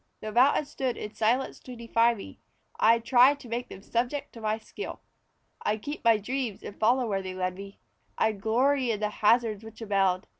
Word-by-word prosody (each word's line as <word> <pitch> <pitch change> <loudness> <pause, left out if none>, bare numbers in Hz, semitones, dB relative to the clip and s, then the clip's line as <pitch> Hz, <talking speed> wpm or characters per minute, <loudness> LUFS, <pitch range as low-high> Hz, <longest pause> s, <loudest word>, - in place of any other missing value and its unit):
Though 215 - -6
mountains 270 +5 +3
stood 260 -3 -2
in 210 - -6
silence 240 +4 0
to 250 - -10
defy 235 0 +2
me, 200 - -10 0.4
I'd 230 +1 +4
try 255 +3 +6
to 280 -3 -13
make 235 +2 -4
them 195 - -11
subject 245 +6 -2
to 230 - -11
my 215 0 0
skill. 225 - -8 0.6
I'd 210 0 -1
keep 290 +1 -6
my 230 -2 +5
dreams 240 0 -4
and 200 - -9
follow 245 +3 +3
where 195 -2 -1
they 185 -1 -6
led 185 0 -1
me; 195 +1 -10 0.4
I'd 215 -3 0
glory 255 +4 +2
in 215 -3 0
the 210 0 0
hazards 220 0 +2
which 220 0 -12
abound. 195 -4 +1
225 Hz, 195 wpm, -28 LUFS, 210-250 Hz, 0.6 s, try